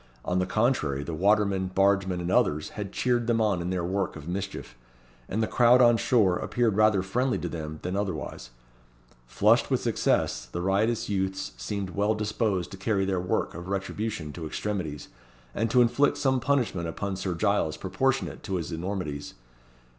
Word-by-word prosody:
On 90 +1 +1
the 90 - 0
contrary, 95 - +1
the 80 - -5
watermen, 100 +2 +2
bargemen, 95 -1 +2
and 85 +1 -2
others, 85 -10 +2
had 100 -2 -6
cheered 120 -2 0
them 115 -1 +2
on 105 -5 +1
in 85 - -3
their 90 -2 -1
work 95 +1 -1
of 80 -1 -9
mischief; 95 -9 -5 0.5
and 110 +3 0
the - - 0
crowd 125 +1 +5
on 120 -2 +6
shore 110 -6 +3
appeared 115 -4 0
rather 105 -3 +4
friendly 125 +7 0
to - - -4
them 80 -1 -5
than 90 +1 -2
otherwise. 85 -11 -4 0.8
Flushed - - +3
with - - +2
success, 60 - 0
the 85 - -5
riotous 100 +5 +1
youths 95 -1 -2
seemed 95 +11 -4
well 105 +3 +1
disposed 105 -3 -1
to 95 - -8
carry 95 0 0
their 95 -2 0
work 90 - -1
of 85 +2 -8
retribution 100 -4 -3
to 80 -3 -6
extremities, 85 -6 -4 0.4
and 115 +2 0
to 125 +2 +5
inflict 140 +4 +2
some 130 -2 +2
punishment 120 -11 0
upon 100 +4 -3
Sir 95 -2 -3
Giles 100 -5 +1
proportionate 130 +8 -1
to 95 - -3
his 85 -1 -3
enormities. 80 -4 -4
95 Hz, 175 wpm, -27 LUFS, 90-110 Hz, 0.8 s, on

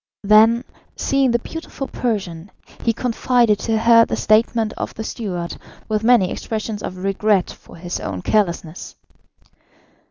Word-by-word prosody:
Then, 220 +3 +5 0.3
seeing 275 -1 +1
the 235 - +3
beautiful 275 +1 -7
Persian, 195 -7 -3 0.3
he 230 - +2
confided 235 -2 +1
to 225 -1 0
her 230 +1 +6
the - - -2
statement 220 0 +2
of - - -6
the 220 - -5
steward, 180 -7 -5 0.3
with 215 0 -1
many 230 -6 +4
expressions 215 -1 -4
of 185 - -6
regret 195 -1 +1
for - - -15
his 175 +1 -5
own 90 -2 -5
carelessness. 175 -5 -1
215 Hz, 135 wpm, -20 LUFS, 190-235 Hz, 0.3 s, her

